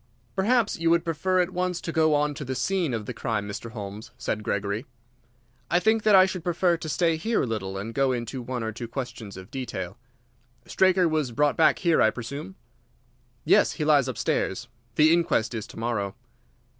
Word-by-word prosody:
"Perhaps 225 0 +2
you 165 0 +2
would 170 0 +3
prefer 185 +3 +1
at 180 +1 -1
once 180 -1 -1
to 165 - -5
go 155 -1 +3
on 150 0 +1
to 145 - -6
the 130 -1 -4
scene 185 -1 0
of 110 -3 -3
the 125 - -5
crime, 110 -2 -2
Mr. 105 +3 -6
Holmes?" 105 -1 -7
said 110 -2 -2
Gregory. 100 +4 -2 0.8
"I 175 - +3
think 220 +3 +2
that 210 -1 +5
I 185 0 +8
should 185 -3 -4
prefer 175 0 +2
to 160 -1 -6
stay 165 +1 +1
here 220 +8 0
a - - 0
little 95 -5 -3
and 105 +4 -5
go 135 0 +2
into 125 +1 -3
one 125 -1 -4
or 110 - -2
two 120 +2 -6
questions 115 -5 -6
of 95 +3 -11
detail. 110 -7 -5 0.7
Straker 185 -1 +3
was 155 -5 0
brought 145 +2 +2
back 160 -1 +4
here, 170 -3 +2
I 110 - +6
presume?" 140 - -7 0.9
"Yes; - - +4
he 155 - -3
lies 145 -4 +4
upstairs. 125 -2 -1 0.3
The 155 +4 +5
inquest 165 -10 +1
is 110 -2 -4
to - - -13
morrow." 110 -3 -2
140 Hz, 195 wpm, -26 LUFS, 115-170 Hz, 0.9 s, I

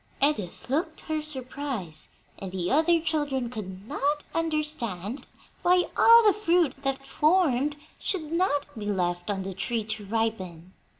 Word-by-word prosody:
Edith 245 - 0
looked 315 +4 -1
her 310 -1 -2
surprise, 260 - -4 0.3
and 190 -2 -6
the 180 -2 -2
other 325 +4 +4
children 290 -6 -1
could 195 -3 -7
not 295 +2 0
understand 295 - -2 0.3
why 360 0 +4
all 465 0 +8
the 415 - +6
fruit 345 -8 +2
that 270 0 -2
formed 300 -3 +2 0.2
should 320 -6 -2
not 335 -5 +1
be 210 -2 -5
left 175 -3 -1
on 195 -2 -1
the 190 0 -5
tree 215 +5 -2
to 215 -1 -5
ripen. 190 -6 -2
270 Hz, 140 wpm, -27 LUFS, 205-310 Hz, 0.3 s, all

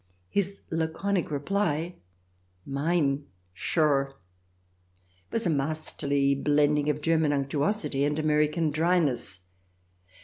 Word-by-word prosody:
His 200 0 -1
laconic 165 +4 -1
reply, 165 +2 -1 0.4
" 90 0 -40
Mine! 140 0 0 0.3
Sure 135 - +1 0.6
!" 90 0 -38
was 230 - 0
a - - +2
masterly 140 -1 0
blending 145 +1 +2
of 150 0 -1
German 160 -2 +3
unctuosity 140 +3 0
and 145 +1 +1
American 150 +1 +2
dryness. 150 - +1
150 Hz, 100 wpm, -27 LUFS, 140-160 Hz, 0.6 s, German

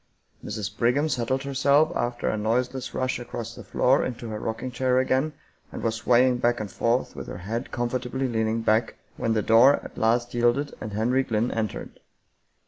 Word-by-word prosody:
Mrs. 105 -1 -5
Brig 120 +3 +2
ham 145 +2 +1
settled 130 0 -1
herself 140 +3 +2
after 120 0 -2
a - - +1
noiseless 125 +4 -1
rush 130 -1 -1
across 120 -1 -6
the - - -10
floor 130 +2 +2
into 120 -2 -5
her 105 -1 -4
rocking 115 +4 -4
chair 125 +1 +1
again, 130 +4 +1 0.4
and - - -7
was 115 - +1
swaying 125 +2 +3
back 120 0 +1
and 105 -2 -5
forth 120 +2 0
with - - -7
her - - -6
head 110 +8 -4
comfortably 125 +2 -2
leaning 110 -1 0
back, 110 +1 +2 0.2
when 115 - 0
the 110 -2 0
door 120 +5 +6
at - - -9
last 120 +2 +1
yielded 120 +4 +1
and 105 - -5
Henry 120 +5 +2
Glynn 115 -1 -1
entered. 110 -2 -4
120 Hz, 185 wpm, -25 LUFS, 115-130 Hz, 0.4 s, door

